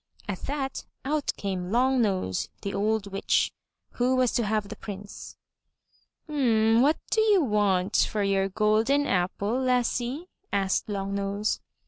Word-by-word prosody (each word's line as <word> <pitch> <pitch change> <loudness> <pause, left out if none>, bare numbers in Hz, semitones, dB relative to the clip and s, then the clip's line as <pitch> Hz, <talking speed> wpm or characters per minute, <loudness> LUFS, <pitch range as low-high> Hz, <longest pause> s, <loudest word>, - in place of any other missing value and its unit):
At 200 -3 -3
that, 275 -2 -3 0.2
out 295 +1 0
came 185 -2 -3
Long 255 +2 +3
nose, 185 - -1
the 200 - -3
old 215 +1 0
witch, 195 - +1 0.4
who 250 +1 +1
was 255 -2 +3
to 240 - +1
have 215 -1 0
the 220 - -6
Prince. 200 -1 -9 0.9
What 245 -1 +3
do 440 - +3
you 415 -5 +4
want 205 -5 +2
for 210 -1 -1
your 195 -1 +1
golden 220 +8 +2
apple, 200 +5 0
lassie?" 250 +3 0 0.3
asked 195 -1 0
the 210 - -3
Long 195 0 -3
nose. 200 +1 -1
215 Hz, 140 wpm, -27 LUFS, 200-255 Hz, 0.9 s, you